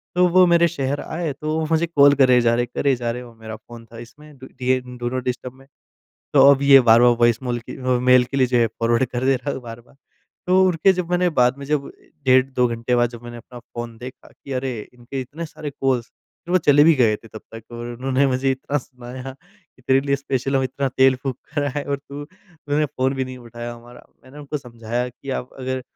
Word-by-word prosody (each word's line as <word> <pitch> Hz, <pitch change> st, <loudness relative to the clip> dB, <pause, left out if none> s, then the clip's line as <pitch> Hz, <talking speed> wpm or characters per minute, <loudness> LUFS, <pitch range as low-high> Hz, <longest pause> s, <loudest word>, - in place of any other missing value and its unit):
तो 180 Hz, 0 st, +4 dB
वो 185 Hz, +1 st, +6 dB
मेरे 170 Hz, 0 st, +4 dB
शहर 145 Hz, -4 st, -3 dB
आए 160 Hz, -1 st, -4 dB
तो 155 Hz, +3 st, -3 dB
वो 160 Hz, -, -1 dB
मुझे 165 Hz, +1 st, +2 dB
कॉल 145 Hz, -3 st, +5 dB
करे 130 Hz, -2 st, +5 dB
जा 115 Hz, -1 st, +2 dB
रहे 120 Hz, -, +1 dB
हैं, 120 Hz, -, -7 dB
करे 140 Hz, -2 st, +2 dB
जा 120 Hz, -1 st, -3 dB
रहे 125 Hz, -, -6 dB
हैं 125 Hz, -, -11 dB
वो -, -, -17 dB
मेरा 110 Hz, -1 st, -9 dB
फ़ोन 120 Hz, -1 st, -13 dB
था -, -, -10 dB
इसमें 150 Hz, +4 st, -14 dB
डु 130 Hz, -, -11 dB
डिएन 125 Hz, -1 st, -1 dB
डू 120 Hz, 0 st, -3 dB
नॉट 130 Hz, 0 st, -3 dB
डिस्टर्ब 125 Hz, 0 st, -4 dB
में। 135 Hz, +1 st, -20 dB, 0.7 s
तो 140 Hz, -, +6 dB
अब 140 Hz, 0 st, +3 dB
ये 140 Hz, -1 st, +8 dB
बार-बार 120 Hz, 0 st, +6 dB
वॉइस 120 Hz, +1 st, +3 dB
मेल 120 Hz, -2 st, -2 dB
की 115 Hz, -, -10 dB
वो 125 Hz, -1 st, +1 dB
मेल 125 Hz, 0 st, +5 dB
के 135 Hz, -, -6 dB
लिए 130 Hz, -, +3 dB
जो 125 Hz, 0 st, 0 dB
है 115 Hz, -, +4 dB
फॉरवर्ड 115 Hz, +2 st, 0 dB
कर 125 Hz, 0 st, -4 dB
दे 135 Hz, -, +3 dB
रहा 140 Hz, +3 st, -5 dB
है -, -, -5 dB
बार-बार। 120 Hz, +2 st, -12 dB, 0.5 s
तो 185 Hz, +1 st, +4 dB
उनके 180 Hz, +1 st, +3 dB
जब 180 Hz, -2 st, -4 dB
मैंने 180 Hz, 0 st, +2 dB
बाद 125 Hz, -3 st, +2 dB
में 140 Hz, -, -7 dB
जब 145 Hz, -1 st, -1 dB, 0.3 s
डेढ़ 130 Hz, 0 st, +5 dB
2 130 Hz, -2 st, +1 dB
घंटे 115 Hz, +1 st, -2 dB
बाद 120 Hz, -1 st, +2 dB
जब 120 Hz, -1 st, -11 dB
मैंने 120 Hz, 0 st, -9 dB
अपना 120 Hz, +1 st, -12 dB
फ़ोन 120 Hz, -1 st, -8 dB
देखा 130 Hz, +1 st, -11 dB
कि, 140 Hz, -, -11 dB
"अरे! 130 Hz, -2 st, -3 dB, 0.2 s
इनके 125 Hz, +2 st, -7 dB
इतने 150 Hz, +6 st, -7 dB
सारे 155 Hz, -1 st, -8 dB
कॉल्स।" 130 Hz, -4 st, -1 dB, 0.4 s
फिर 175 Hz, -, -5 dB
वो 185 Hz, -, +5 dB
चले 145 Hz, -3 st, +5 dB
भी 165 Hz, 0 st, +6 dB
गए 115 Hz, -6 st, +3 dB
थे 115 Hz, -, -17 dB
तब 110 Hz, -, -10 dB
तक 115 Hz, -, -8 dB
और 120 Hz, 0 st, -6 dB
उन्होंने 130 Hz, +3 st, 0 dB
मुझे 135 Hz, 0 st, 0 dB
इतना 135 Hz, +2 st, -2 dB
सुनाया 125 Hz, 0 st, -9 dB
कि 130 Hz, -, -28 dB
तेरे 130 Hz, +1 st, +3 dB
लिए 140 Hz, 0 st, 0 dB
स्पेशल 135 Hz, -1 st, -2 dB
हम 135 Hz, -, +1 dB
इतना 135 Hz, +1 st, -2 dB
तेल 130 Hz, 0 st, +5 dB
फूँक 130 Hz, -3 st, -3 dB, 0.2 s
कर 145 Hz, -1 st, 0 dB
आए 145 Hz, +1 st, -3 dB
और 140 Hz, 0 st, -2 dB
तू 140 Hz, +1 st, -10 dB
उन्होंने 155 Hz, -3 st, -4 dB
फ़ोन 130 Hz, 0 st, -1 dB
भी 130 Hz, -1 st, -2 dB
नहीं 130 Hz, 0 st, -9 dB
उठाया 120 Hz, 0 st, -8 dB
हमारा। 120 Hz, +1 st, -15 dB, 0.2 s
मैंने 130 Hz, +3 st, -14 dB
उनको 145 Hz, +1 st, -5 dB
समझाया 120 Hz, -1 st, -4 dB
कि 130 Hz, +3 st, -10 dB
आप 125 Hz, -, -14 dB
अगर 130 Hz, 0 st, -3 dB
130 Hz, 245 wpm, -21 LUFS, 120-140 Hz, 0.7 s, ये